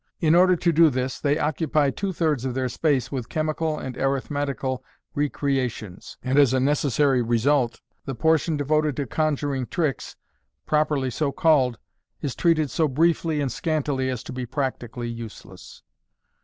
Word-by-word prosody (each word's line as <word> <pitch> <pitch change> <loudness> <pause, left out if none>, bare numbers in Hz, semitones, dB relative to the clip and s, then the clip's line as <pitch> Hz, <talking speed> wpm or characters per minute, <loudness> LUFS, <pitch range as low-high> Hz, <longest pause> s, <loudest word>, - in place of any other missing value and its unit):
In 160 -2 +3
order 180 +1 +6
to 170 0 +1
do 165 0 +6
this, 130 -1 -2
they 145 0 +1
occupy 150 -2 +1
two 195 +8 -3
thirds 155 -7 0
of 130 -2 -3
their 130 -1 -1
space 135 -2 0
with 130 -4 -4
chemical 155 0 -1
and 130 -4 -6
arithmetical 135 -1 -2 0.3
recreations, 135 -9 -2
and 130 +3 +2
as 135 -3 +5
a - - +2
necessary 140 -1 +2
result, 120 +2 +1 0.2
the 135 - -4
portion 160 +3 +2
devoted 150 0 +1
to 140 - -2
conjuring 145 -2 -1
tricks, 155 -7 -2 0.5
pro 155 0 +3
perly 135 -4 -1
so 150 -3 0
called, 135 -7 +3 0.4
is 140 - -3
treated 155 -5 +2
so 160 +7 +2
briefly 160 +2 +1
and 135 -3 -1
scantily 145 -2 -1
as 125 -4 -4
to - - -8
be 125 -1 -4
practically 125 -3 -3
useless. 115 -2 -10
140 Hz, 155 wpm, -24 LUFS, 130-155 Hz, 0.5 s, order